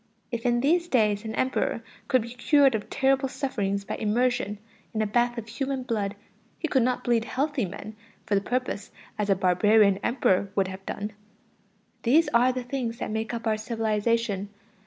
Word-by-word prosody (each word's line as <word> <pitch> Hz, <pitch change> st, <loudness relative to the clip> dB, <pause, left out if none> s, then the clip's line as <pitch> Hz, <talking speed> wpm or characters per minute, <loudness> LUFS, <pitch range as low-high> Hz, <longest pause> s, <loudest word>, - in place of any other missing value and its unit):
If 235 Hz, 0 st, -2 dB
in 240 Hz, 0 st, +2 dB
these 340 Hz, +5 st, +2 dB
days 215 Hz, -7 st, +2 dB
an 220 Hz, -, -4 dB
Emperor 255 Hz, -3 st, 0 dB, 0.2 s
could 255 Hz, -3 st, +3 dB
be 235 Hz, +1 st, -8 dB
cured 275 Hz, +2 st, +4 dB
of 215 Hz, -2 st, -3 dB
terrible 270 Hz, 0 st, +2 dB
sufferings 205 Hz, -8 st, -2 dB
by -, -, -4 dB
immersion 225 Hz, -1 st, 0 dB, 0.4 s
in 220 Hz, -, +1 dB
a -, -, 0 dB
bath 240 Hz, +3 st, +1 dB
of 230 Hz, -1 st, -5 dB
human 265 Hz, +3 st, -3 dB
blood, 210 Hz, -5 st, -2 dB, 0.4 s
he 320 Hz, -, -2 dB
could 265 Hz, -4 st, +2 dB
not 250 Hz, +1 st, 0 dB
bleed 235 Hz, -2 st, +2 dB
healthy 275 Hz, -2 st, -1 dB
men 200 Hz, +3 st, -8 dB, 0.3 s
for -, -, -2 dB
the 200 Hz, -, +3 dB
purpose 245 Hz, -2 st, -2 dB, 0.3 s
as 210 Hz, -1 st, 0 dB
a 195 Hz, -, +5 dB
barbarian 200 Hz, +2 st, +4 dB
Emperor 200 Hz, -6 st, +1 dB
would 195 Hz, -2 st, +1 dB
have 190 Hz, +1 st, -8 dB
done. 205 Hz, +1 st, -4 dB, 0.9 s
These 295 Hz, +6 st, +4 dB
are 245 Hz, +2 st, +5 dB
the 255 Hz, 0 st, -4 dB
things 245 Hz, -2 st, -3 dB
that -, -, -4 dB
make 220 Hz, 0 st, -2 dB
up 235 Hz, -1 st, -5 dB
our 220 Hz, -1 st, +2 dB
civilization. 220 Hz, -2 st, 0 dB
230 Hz, 180 wpm, -26 LUFS, 210-255 Hz, 0.9 s, a